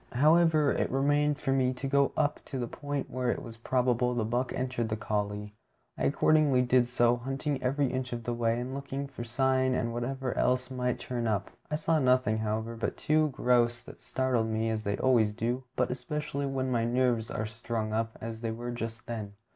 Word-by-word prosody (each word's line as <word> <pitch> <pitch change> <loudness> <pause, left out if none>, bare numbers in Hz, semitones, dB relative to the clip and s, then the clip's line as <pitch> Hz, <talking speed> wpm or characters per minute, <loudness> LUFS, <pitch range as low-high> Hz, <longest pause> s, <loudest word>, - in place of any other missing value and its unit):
However, 155 +2 +4
it - - 0
remained 145 +2 +2
for 135 - -1
me 130 -1 +2
to 130 +2 -4
go 140 0 +3
up 150 -1 +1
to 135 - -5
the 125 - -1
point 145 +3 -4
where 125 -1 -1
it - - -1
was 115 -1 -9
probable 125 0 +1
the 115 -3 0
buck 120 +3 -1
entered 125 -3 -2
the 110 - 0
coulée. 105 -1 -2 0.4
I - - -1
accordingly 145 -2 +4
did 125 -1 +3
so, 120 -1 +3
hunting 135 +3 -3
every 140 +3 +1
inch 130 -1 -2
of 120 -1 -4
the 120 - -2
way, 115 0 +1
and 125 +2 -4
looking 140 0 -4
for 130 -3 -7
sign 130 +2 +1
and 115 -1 -1
whatever 130 +2 -2
else 130 +1 +1
might 125 -1 -1
turn 120 -2 -3
up. 105 -3 -1 0.2
I 150 - 0
saw 160 +1 +1
nothing, 125 -5 +3
however, 110 +1 -2
but 115 - -3
two 155 0 +2
grouse 120 -2 +2
that - - -13
startled 130 -4 0
me, 110 0 0
as 110 -1 -1
they 100 0 0
always 115 -5 +3
do, 120 +3 -2
but 125 - +1
especially 140 +1 -3
when 130 -1 -1
my 115 -2 +1
nerves 120 -1 +1
are 110 - -2
strung 110 0 -3
up 115 0 -1
as 115 0 -6
they 115 - -2
were 120 +2 -4
just 115 -1 -5
then. 110 -4 -5
125 Hz, 205 wpm, -29 LUFS, 115-135 Hz, 0.4 s, However